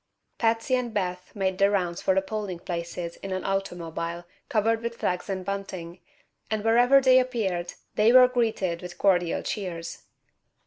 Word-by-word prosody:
Patsy 225 +2 +1
and 250 -2 +1
Beth 180 -2 -2
made 190 -2 -1
the 200 0 +5
rounds 180 -4 -1
of 190 - +4
the 190 - +2
polling 205 -3 -4
places 170 0 -5
in 195 - -7
an 185 0 -2
automobile 175 -3 -3 0.2
covered 225 +1 +1
with 235 0 -4
flags 180 +2 -2
and 190 -1 -3
bunting, 190 -3 -5 0.5
and 215 -1 -1
wherever 245 +4 +5
they 260 -1 +6
appeared 200 -9 -2 0.2
they 215 +2 +4
were 255 0 +8
greeted 220 -8 -1
with 180 -1 -8
cordial 180 -4 +2
cheers. 175 -5 -5
195 Hz, 160 wpm, -26 LUFS, 175-225 Hz, 0.5 s, were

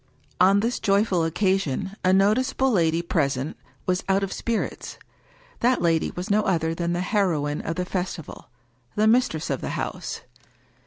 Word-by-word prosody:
On 195 +3 +5
this 235 +3 -1
joyful 200 -4 +2
occasion 190 0 0
a 185 - +4
noticeable 215 +7 +3
lady 170 -4 +2
present 140 -4 -1 0.3
was 185 0 0
out 195 +1 +3
of 195 - -3
spirits. 230 -2 -3 0.6
That 250 +2 +3
lady 165 -2 +2
was 180 +1 -4
no 210 +1 +4
other 165 -5 0
than 170 +1 -2
the 175 - -1
heroine 170 -8 0
of 165 - -3
the 180 - -2
festival, 180 -4 -5 0.5
the 210 - +2
mis 245 +3 +5
tress 160 0 -4
of - - -2
the - - -3
house - - -4
185 Hz, 160 wpm, -24 LUFS, 165-205 Hz, 0.6 s, On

